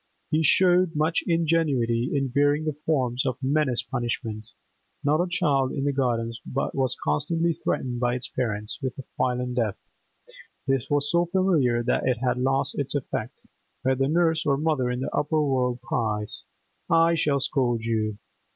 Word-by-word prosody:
He 155 +1 +3
showed 180 +2 +4
much 155 +2 +1
ingenuity 150 -8 +1
in 135 -2 0
varying 145 +3 +2
the 155 - 0
forms 135 -4 0
of 130 -1 -1
menaced 135 -2 0
punishment. 115 -3 -3 0.6
Not 150 +3 +3
a 180 - -1
child 140 -7 +1
in 135 - -2
the 145 - +1
Gardens 115 -3 -1
but 135 - -3
was 130 -1 0
constantly 165 - +1
threatened 125 -5 -2
by 120 0 +1
its 125 0 -4
parents 105 -4 -3
with 130 +1 -3
a 135 - -6
violent 125 0 -1
death; 110 -5 0 0.9
this 135 -2 0
was 145 0 +1
so 170 0 +2
familiar 165 -11 +2
that 125 - 0
it 125 -2 +2
had 125 +1 0
lost 135 +2 0
its 140 0 -2
effect; 140 - -4 0.4
where 130 - +3
the 135 +1 +1
nurse 160 +1 +2
or 140 -2 +2
mother 150 -4 0
in 125 +1 -2
the - - -3
upper 155 +1 +1
world 130 -4 +1
cries, 105 -4 -2 0.4
'I 165 0 +4
shall 150 -3 +1
scold 125 -4 0
you! 110 -2 -1
135 Hz, 170 wpm, -25 LUFS, 125-155 Hz, 0.9 s, showed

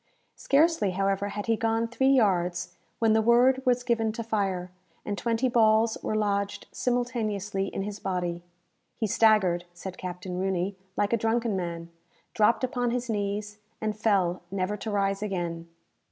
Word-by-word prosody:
Scarcely, 295 - +3
however, 195 +2 0
had 205 0 -5
he 230 - +2
gone 225 +1 0
three 265 +3 +1
yards, 180 -9 +2 0.2
when 225 -1 +3
the 220 - +4
word 245 +3 +4
was 245 0 +3
given 230 -3 +1
to 230 - -4
fire, 195 -5 -1 0.3
and 205 - -2
twenty 230 +4 0
balls 225 -2 +4
were 215 - -2
lodged 200 -1 -1
simultaneously 215 -6 -1
in 195 - -4
his 210 0 -5
body. 175 -2 -2 0.6
"He 225 - 0
staggered," 195 -5 +3
said 185 +1 -8
Captain 180 0 -5
Rooney, 190 0 -1 0.2
"like 205 +2 +1
a - - +4
drunken 225 -1 0
man, 170 -2 -4 0.4
dropped 220 +4 +3
upon 245 -1 0
his 240 0 -2
knees, 205 0 -3 0.2
and 215 -1 -2
fell 195 -5 +1
never 195 +1 -1
to 210 +2 -6
rise 195 -1 0
again." 175 -5 -3
210 Hz, 155 wpm, -27 LUFS, 190-230 Hz, 0.6 s, the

